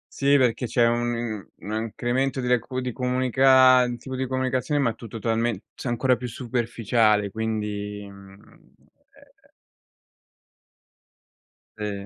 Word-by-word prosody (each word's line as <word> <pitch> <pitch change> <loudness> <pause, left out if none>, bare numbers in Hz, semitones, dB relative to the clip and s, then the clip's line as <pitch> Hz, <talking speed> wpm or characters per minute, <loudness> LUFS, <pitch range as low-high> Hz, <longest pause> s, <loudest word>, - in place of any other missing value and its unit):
Sì, 140 +1 +4
perché 125 -2 +1
c'è 120 0 +2
un 120 0 0
un 110 - -5 0.2
un - - -2
incremento 125 +4 -1
di 125 - -3
decu 125 +1 0
di 125 0 -3
comunica 130 0 +4
un 120 -1 -3
tipo 130 +3 -7
di 130 0 -2
comunicazione, 130 +3 -1
ma 120 -5 +1
tu 115 - -11
totalmen 115 0 -1
cioè - - -7
ancora 125 +2 +2
più 125 0 -6
superficiale, 115 -3 0
quindi, 105 -2 -4
mhmm, 100 +1 -16 0.8
e - - -27 2.3
Sì. 105 -2 -5
120 Hz, 130 wpm, -24 LUFS, 110-130 Hz, 2.3 s, Sì